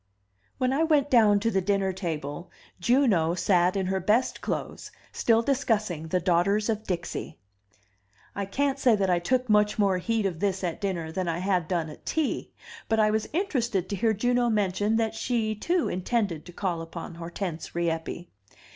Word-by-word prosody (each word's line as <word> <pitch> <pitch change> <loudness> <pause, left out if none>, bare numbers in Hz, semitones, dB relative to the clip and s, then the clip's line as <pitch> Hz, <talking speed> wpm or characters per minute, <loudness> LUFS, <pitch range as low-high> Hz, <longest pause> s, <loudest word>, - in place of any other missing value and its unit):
When 255 0 +1
I 285 - +1
went 295 -3 +2
down 215 -5 +5
to 230 +1 +1
the 190 - +1
dinner 195 0 0
table, 165 -2 -5 0.3
Juno 190 - +3
sat 180 -1 +2
in 190 - 0
her 190 +1 0
best 210 +7 +1
clothes, - - -4 0.2
still 230 0 +2
discussing 215 - 0
the 180 +3 +1
Daughters 190 +5 +2
of 220 -1 -1
Dixie. 175 -3 -4 1.0
I 200 -1 -3
can't 275 +6 0
say 245 -4 +4
that 195 -2 +1
I 175 - +3
took 255 +8 0
much 210 -1 +3
more 195 -3 +2
heed 225 +2 0
of 175 -4 -2
this 195 -1 -1
at 175 +1 -3
dinner 175 -5 -2
than 185 +1 -2
I 165 -1 -1
had 180 -2 0
done 170 -4 -1
at 150 - -11
tea; 315 -4 -2 0.4
but 225 - +2
I 215 0 +4
was 220 0 -1
interested 240 - -1
to 200 - -2
hear 220 +4 +2
Juno 245 +3 +1
mention 205 0 +1
that 225 -1 +1
she, 225 -1 -1
too, 340 - 0
intended 185 -3 -1
to - - -9
call 175 -2 -2
upon 165 +1 -7
Hortense 170 -1 -5
Rieppe. 170 0 -2
200 Hz, 180 wpm, -27 LUFS, 175-230 Hz, 1.0 s, down